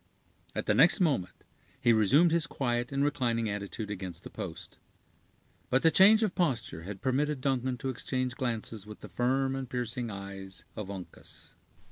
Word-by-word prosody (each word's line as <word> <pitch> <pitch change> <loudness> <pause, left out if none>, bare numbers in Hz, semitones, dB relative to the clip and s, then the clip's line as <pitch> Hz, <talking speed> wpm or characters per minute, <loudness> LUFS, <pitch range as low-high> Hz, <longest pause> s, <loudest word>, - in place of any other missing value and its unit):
At - - -2
the - - +3
next 140 - +6
moment 140 - 0 0.4
he 120 -1 +4
resumed 140 - +5
his 165 -2 +2
quiet 120 -3 -1
and 140 0 +1
reclining 120 -6 +1
attitude 105 +1 -4
against 95 -4 -6
the - - -9
post. - - -7 0.9
But 130 - +2
the 165 - +6
change 215 +5 +7
of 205 -4 +1
posture 120 - -1
had 95 +2 -8
permitted 140 +2 +1
Duncan 130 -1 0
to 135 +3 -3
exchange 130 0 -2
glances 115 -4 -3
with 105 - -10
the - - -9
firm 135 +2 +1
and 135 -2 -5
piercing 120 -1 -2
eyes 100 -1 -8
of 105 -3 -5
Uncas. 95 -3 -6
125 Hz, 165 wpm, -30 LUFS, 105-135 Hz, 0.9 s, change